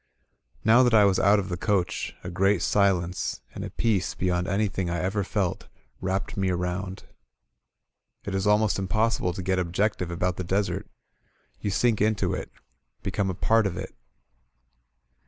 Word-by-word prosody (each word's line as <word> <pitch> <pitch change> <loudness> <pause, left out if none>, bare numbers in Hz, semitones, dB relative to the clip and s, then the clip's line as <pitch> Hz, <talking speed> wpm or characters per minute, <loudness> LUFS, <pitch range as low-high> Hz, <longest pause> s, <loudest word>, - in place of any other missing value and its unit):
Now 115 +3 +7
that 120 -3 +4
I 105 -2 +7
was 95 -2 +3
out 100 +2 +5
of 100 -1 -2
the 90 - -3
coach, 95 -1 -1
a 90 - -5
great 95 +1 +2
silence, 95 -3 +1
and - - -6
a - - -5
peace 105 -6 0
be - - -3
yond 90 0 0
anything 100 -2 0
I 85 - -1
ever 95 +4 -1
felt, 95 -2 -2 0.3
wrapped 95 +1 -2
me 95 -1 0
around. 90 +2 -3 1.2
It 100 - -5
is 95 +1 0
almost 105 -1 +3
impossible 110 0 +1
to 95 - -6
get 95 0 +1
objective 90 +1 0
about 90 +1 -1
the 95 - -3
desert; 95 +3 -1 0.7
you 105 - -2
sink 110 +2 +2
into 110 -1 +1
it, - - -5 0.3
— - - -46
^become 100 0 -1
a 95 - -2
part 110 +3 +3
of 90 -2 -4
it. 95 0 -6
95 Hz, 170 wpm, -26 LUFS, 90-105 Hz, 1.2 s, Now